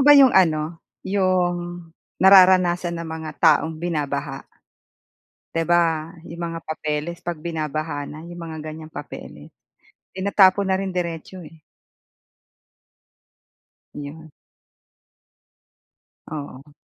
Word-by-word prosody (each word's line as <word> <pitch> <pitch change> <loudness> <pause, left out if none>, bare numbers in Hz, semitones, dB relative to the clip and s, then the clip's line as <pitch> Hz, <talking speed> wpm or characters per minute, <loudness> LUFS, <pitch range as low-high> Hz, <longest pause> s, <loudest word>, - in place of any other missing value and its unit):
ba 290 +1 +8
yung 270 -3 +7
ano, 165 -3 +2 0.2
yung 175 -3 0 0.3
nararanasan 185 -2 +5
ng 170 - -5
mga 160 -1 -6
taong 160 +1 +3
binabaha? 150 -4 -3 1.1
Di 165 -1 -1
ba, 165 -1 +1
'yong 170 +1 -10
mga 165 -1 -4
papeles 155 +2 -3
'pag 175 -1 -4
binabaha 155 -3 -3
na 155 +2 -9
'yong 175 0 -9
mga 160 -1 -7
ganyang 155 0 -8
papeles 145 - -9 0.6
tinatapon 195 0 +4
na 190 - +3
rin 195 -1 -3
diretso, 175 +1 -4
eh. 160 0 -14 2.3
'Yon. 155 +2 -9 2.0
Oo. 145 -1 -8
165 Hz, 100 wpm, -22 LUFS, 155-180 Hz, 2.3 s, ba